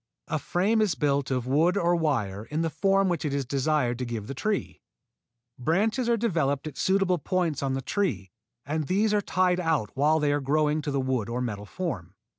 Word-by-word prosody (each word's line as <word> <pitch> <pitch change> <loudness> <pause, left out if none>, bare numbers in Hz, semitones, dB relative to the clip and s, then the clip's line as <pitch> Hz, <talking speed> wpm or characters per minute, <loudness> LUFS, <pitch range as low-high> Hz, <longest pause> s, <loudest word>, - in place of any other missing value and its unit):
A 155 -1 0
frame 205 +9 +1
is 200 -7 +2
built 140 -2 0
of 125 -2 -1
wood 160 +8 +2
or 175 -2 +2
wire 115 - -1
in 155 +5 -2
the 165 - -1
form 195 +5 +2
which 175 -2 -1
it 145 -2 -1
is 140 -2 -1
desired 135 -2 0
to - - -2
give 115 -3 -4
the 135 - -5
tree. 205 +9 -2 0.8
Branches 215 - +1
are 235 - +3
developed 160 - 0
at 155 -3 -6
suitable 190 -2 +2
points 170 -1 -1
on 135 -1 0
the 135 - -3
tree 180 - -1 0.3
and 155 0 -2
these 210 +3 +2
are 210 - +3
tied 185 -2 +1
out 160 -10 0
while 150 +3 +3
they 145 -1 +2
are 145 - 0
growing 150 +2 +1
to 150 - -4
the 140 -1 0
wooden 130 -4 -1
or 120 - -2
metal 105 -5 -4
form. 105 - -5
150 Hz, 210 wpm, -27 LUFS, 135-180 Hz, 0.8 s, are